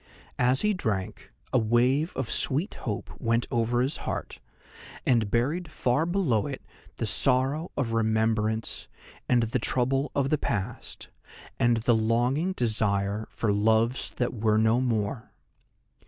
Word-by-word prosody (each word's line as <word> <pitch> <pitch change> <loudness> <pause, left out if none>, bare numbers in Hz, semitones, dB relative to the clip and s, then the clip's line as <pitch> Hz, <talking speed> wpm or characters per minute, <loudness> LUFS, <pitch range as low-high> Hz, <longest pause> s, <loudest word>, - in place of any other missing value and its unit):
As 125 +2 +3
he 210 0 +2
drank, 105 - -3 0.2
a 130 - +5
wave 125 +8 +2
of 130 - -2
sweet 150 - +1
hope 105 -5 -5
went 115 +1 +1
over 120 +1 +1
his 135 +4 0
heart, - - -5 0.7
and 115 -5 +2
buried 145 - 0
far 140 +1 0
below 165 - +1
it 135 -6 -6 0.3
the 115 - -2
sorrow 135 - +1
of 120 -5 -1
remembrance, 110 -1 0 0.4
and 120 -1 +4
the 115 - -1
trouble 135 +3 0
of 140 -1 +1
the 155 - +2
past, 100 -5 -4 0.5
and 120 -1 +3
the 115 +2 +2
longing 120 +10 +1
desire 105 - 0
for 105 -3 -1
loves 110 +4 +2
that 125 - -1
were 110 -2 +1
no 110 +3 +3
more. 110 -2 -2
120 Hz, 140 wpm, -27 LUFS, 110-135 Hz, 0.7 s, a